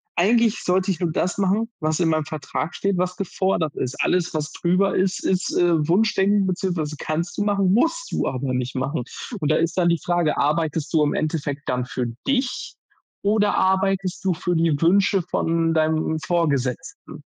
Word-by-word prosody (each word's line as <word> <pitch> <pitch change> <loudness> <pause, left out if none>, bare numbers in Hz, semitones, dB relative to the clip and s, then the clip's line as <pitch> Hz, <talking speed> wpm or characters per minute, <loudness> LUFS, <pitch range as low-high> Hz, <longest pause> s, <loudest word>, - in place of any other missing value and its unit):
eigentlich 225 +5 +3
sollte 185 +1 +1
ich 180 - -3
nur 175 -3 0
das 180 +3 -1
machen, 210 +4 +1
was 155 +2 -1
in 165 - +3
meinem 155 -1 +1
Vertrag 155 +2 -4
steht, 195 -1 0
was 180 0 -1
gefordert 190 -5 -1
ist.“ 125 - -3
Alles, 180 -1 +1
was 155 0 -2
drüber 185 +3 +1
ist, 190 0 0
ist, 185 -1 0
äh, 165 -3 +2
Wunschdenken 200 +1 +3
beziehungsweise 175 -5 -2
kannst 155 +2 -3
du 205 - +2
machen, 200 -2 +2
musst 415 - +1
du - - -1
aber 130 0 -2
nicht 125 +1 -3
machen 130 0 -2 0.4
und 150 -3 -1
da - - +3
ist 165 +2 0
dann 175 - +3
die 170 - +2
Frage: 175 0 0
Arbeitest 155 0 0
du 155 - +4
im 145 - 0
Endeffekt 145 -2 -3
dann 125 0 -1
für 125 -2 -3 0.2
dich 265 -2 -1 0.5
oder 210 0 +2
arbeitest 190 0 +1
du 185 - +3
für 175 +2 -1
die 160 -3 +2
Wünsche 190 +2 +3
von 165 0 +1
deinem 160 0 +1
Vorgesetzten? 140 -6 -2
170 Hz, 180 wpm, -22 LUFS, 155-190 Hz, 0.5 s, du